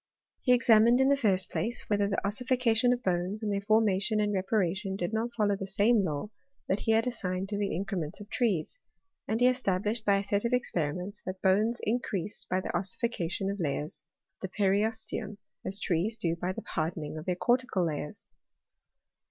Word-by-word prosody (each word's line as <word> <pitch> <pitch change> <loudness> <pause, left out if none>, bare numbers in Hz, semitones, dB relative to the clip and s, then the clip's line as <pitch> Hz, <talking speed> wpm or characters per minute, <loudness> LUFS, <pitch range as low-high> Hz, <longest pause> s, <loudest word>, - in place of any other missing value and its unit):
He 250 - +2
examined, 235 0 +5
in 265 +1 +4
the 280 - +5
first 200 -8 +2
place, 235 +3 -2
whether 205 -1 +1
the 195 - -1
ossification 245 +2 +2
of 245 0 -1
bones, 185 +3 -1
and 210 -1 0
their 200 - -1
formation 215 0 +2
and 210 0 +1
reparation, 190 0 0
did 180 +1 -3
not 225 +2 -1
follow 205 -2 +2
the 195 0 -5
same 205 +2 +3
law 155 +4 -3 0.4
that 190 - +1
he 225 - +1
bad 225 +1 +3
assigned 195 -6 -2
to 205 - -2
the 200 -4 -1
increments 175 -4 -3
of 205 - -10
trees, 225 - -1 0.5
and 220 +1 0
he 245 - +4
esta 250 -8 +2
blished, 215 +3 -2
by 200 -2 +3
a 195 - -1
set 200 +1 0
of 235 +1 0
experiments, 180 -3 -1
that 185 0 -4
bones 210 +5 +3
increase 210 -4 -2
by 185 - 0
the - - -4
ossification 195 -2 -1
of 200 - -5
layers 150 -1 -3 0.4
of 190 - -4
the - - -18
periosteum, 210 +1 0 0.3
as 195 +2 -2
trees 195 +6 0
do 170 -6 0
by 175 +2 -2
the - - -6
hardening 155 -1 -3
of 155 - -9
their 180 - +1
cortical 240 -3 +1
layers. 150 +3 -5
200 Hz, 190 wpm, -29 LUFS, 185-225 Hz, 0.5 s, examined